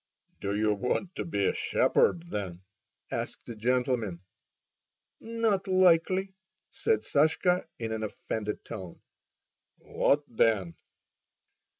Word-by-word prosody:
"Do 100 0 -2
you 105 0 +2
want 125 - -1
to - - -2
be 100 - 0
a - - +2
shepherd, 170 0 +2
then?" 95 -3 -4 0.5
asked - - -4
the 115 - -7
gentleman. 120 -5 0 1.0
"Not 225 -4 0
likely!" 185 +1 +3 0.4
said 450 -1 +1
Sashka, 160 +4 +2
in 115 -1 -4
an 110 0 -2
offended 105 0 -4
tone. 95 -6 -8 0.8
"What 145 +1 +1
then?" 110 -7 +1
120 Hz, 105 wpm, -29 LUFS, -, 1.0 s, likely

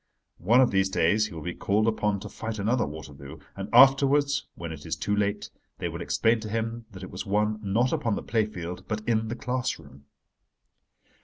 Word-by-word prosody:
One 115 +9 +5
of 130 - +3
these 95 0 +2
days 105 +4 +2
he 100 - -11
will 80 - -7
be 90 - -3
called 105 +3 +1
upon 105 -2 +1
to 105 - -6
fight 110 +1 -5
another 110 - +1
Waterloo: 75 -1 -9 0.2
and 100 +1 -6
afterwards—when 135 - +4
it 75 -2 -8
is - - -3
too 105 - -1
late—they 105 0 -3
will - - -6
explain 115 +1 +2
to 110 -1 -6
him 115 +1 -3
that 95 -3 -11
it 95 - -8
was 90 +3 -6
won 105 +2 +1
not 110 +5 +1
upon 115 -3 0
the - - -5
play 110 -2 +1
field 90 -4 -7
but 110 0 -4
in 110 -1 +1
the 115 - -3
class 125 +1 -2
room. 70 +1 -16
105 Hz, 200 wpm, -27 LUFS, 95-115 Hz, 0.2 s, One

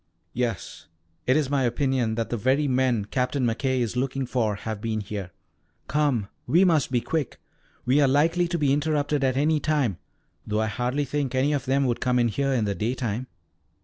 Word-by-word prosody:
"Yes. 120 -5 -3 0.4
It 130 - +4
is 145 -3 0
my 140 -1 +2
opinion 125 -2 0
that 115 0 -3
the - - +1
very 130 +6 +1
men 125 -5 +1
Captain 125 +3 -1
McKay 130 +2 0
is 120 -1 -2
looking 135 +1 -1
for 115 -4 0
have 110 +1 -5
been 110 -1 -1
here. 100 -2 -5 0.6
Come, 140 -9 +1 0.2
we 180 +4 +5
must 160 -8 +2
be 120 -2 +2
quick! 155 -2 -3 0.5
We 130 +4 +4
are 140 - +5
likely 165 +6 +3
to 170 0 -1
be 145 -4 +2
interrupted 145 -1 0
at 130 -1 +1
any 155 +2 +2
time, 145 - 0 0.4
though 105 +1 -1
I - - +1
hardly 125 +6 -1
think 140 -2 -2
any 135 +3 +2
of 140 -2 -1
them 135 +1 +2
would 120 -2 -1
come 125 -1 +2
here 125 +4 +1
in 120 -5 +1
the 100 - 0
daytime." 120 +2 -2
130 Hz, 190 wpm, -25 LUFS, 115-145 Hz, 0.6 s, we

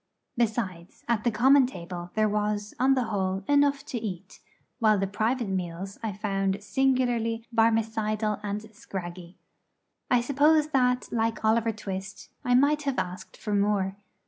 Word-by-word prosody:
Besides, 210 -7 -2
at 235 -3 +1
the 240 - +3
common 260 +4 +5
table 175 -6 -7
there 215 0 +3
was, 210 0 -1
on 265 +2 +4
the 255 - +1
whole, 190 -3 -1
enough 285 -1 +3
to 240 - -4
eat; 190 -6 -6 0.4
while 215 -3 +4
the 195 - 0
private 220 +4 -1
meals 185 0 -4
I 220 -2 -2
found 195 0 -1
singularly 240 -3 +1
Barmecidal 220 -1 +1
and 205 0 -3
scraggy. 180 -4 -8 0.7
I 250 - +4
suppose 295 +4 +3
that, 250 -3 +1
like 225 -1 -1
Oliver 225 +1 +3
Twist, 195 -1 -7
I 245 0 +3
might 290 +3 +4
have 275 -3 -2
asked 185 0 -4
for 210 - -4
more. 200 -1 +1
215 Hz, 145 wpm, -27 LUFS, 195-245 Hz, 0.7 s, common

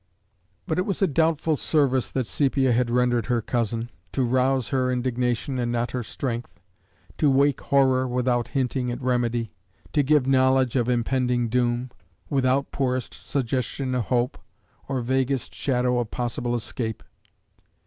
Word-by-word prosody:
But 165 -1 -1
it 185 - 0
was 195 0 0
a - - +7
doubtful 160 +1 +1
service 135 -4 +1
that 130 -2 -1
Sepia 135 0 +1
had 120 0 +2
rendered 120 -2 +1
her 120 -1 +2
cousin 115 0 -2 0.2
to 135 - +1
rouse 130 +1 +1
her 130 -2 +1
indignation 125 +1 -1
and 120 -1 -1
not 120 0 -1
her 125 - -2
strength; 120 +1 -5 0.6
to 150 - +4
wake 140 0 +3
horror 130 -2 +3
without 125 -1 0
hinting 130 -1 -1
at 120 - -3
remedy; 120 -3 0 0.4
to 150 - +4
give 145 -1 +3
knowledge 130 -1 +3
of 120 -2 +1
impending 125 0 +1
doom, 120 +1 0 0.4
without 135 0 +1
poorest 130 -2 -1
suggestion 130 0 -2
of 125 -3 0
hope, 125 +1 0 0.5
or 135 -2 -1
vaguest 130 +1 -1
shadow 125 -2 0
of 120 -3 -2
possible 120 +1 -2
escape. 115 -1 -4
125 Hz, 150 wpm, -25 LUFS, 120-135 Hz, 0.6 s, a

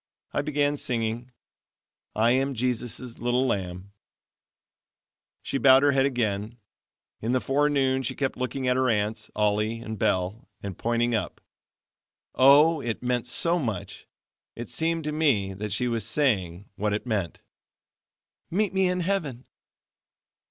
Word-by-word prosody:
I - - +1
began 145 -1 0
singing: 115 -1 -2 0.9
"I 115 +2 +3
am 135 +2 +1
Jesus' 125 0 -3
little 120 +2 +1
lamb." 95 -3 -3 1.5
She 135 - -2
bowed 135 0 +7
her 145 - +5
head 135 0 +3
again. 110 -3 -2 0.6
In 115 +3 -1
the 130 - +3
forenoon 135 -1 +1
she 130 - -3
kept 135 -2 -1
looking 130 +1 -3
at 125 - +3
her 130 0 +2
aunts, 105 0 -1
Ollie 105 +2 +1
and 110 -2 -7
Belle, 95 +5 -1
and 100 -2 -5
pointing 120 +3 0
up. 110 - -2 0.9
Oh! 145 +4 +6
it 120 -1 -4
meant 125 -1 -1
so 170 +7 +1
much. 110 - -5 0.5
It 120 0 -7
seemed 165 0 -1
to 150 - -2
me 130 -12 +1
that 105 +2 -5
she 125 - 0
was 115 -3 -1
saying, 100 - 0
that 105 0 0
it 105 - -3
meant: 100 -9 -3 1.1
"Meet 200 +2 0
me 190 -1 +3
in 180 0 0
heaven." 165 -9 -2
125 Hz, 140 wpm, -26 LUFS, 110-140 Hz, 1.5 s, bowed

